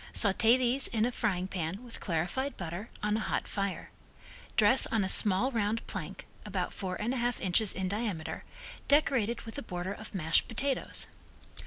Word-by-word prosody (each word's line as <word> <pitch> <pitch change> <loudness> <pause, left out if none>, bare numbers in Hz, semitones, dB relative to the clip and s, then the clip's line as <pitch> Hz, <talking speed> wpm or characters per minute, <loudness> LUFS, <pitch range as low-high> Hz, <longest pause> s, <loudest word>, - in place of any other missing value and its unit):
Saute 225 +4 +6
these 255 +2 +1
in 225 -1 +1
a 245 - 0
frying 190 -7 -1
pan 185 +3 -4
with 240 -2 -9
clarified 180 - -2
butter 175 +5 -5
on 210 0 +1
a - - 0
hot - - -2
fire. 200 -2 -3 0.7
Dress 220 +4 +7
on 220 -3 +1
a - - 0
small 205 +6 +3
round 225 -1 -1
plank, - - -6 0.2
about - - -3
four 185 -2 -4
and 230 +4 -1
a - - -2
half 240 0 -1
inches 190 +2 +3
in 190 0 -2
diameter, 200 -5 -3 0.4
decorated 255 -6 +2
with 225 +5 -7
a - - -5
border 180 -3 -4
of 215 0 -10
mashed 165 -3 +2
potatoes. 270 +4 -1
210 Hz, 175 wpm, -30 LUFS, 190-240 Hz, 0.7 s, Dress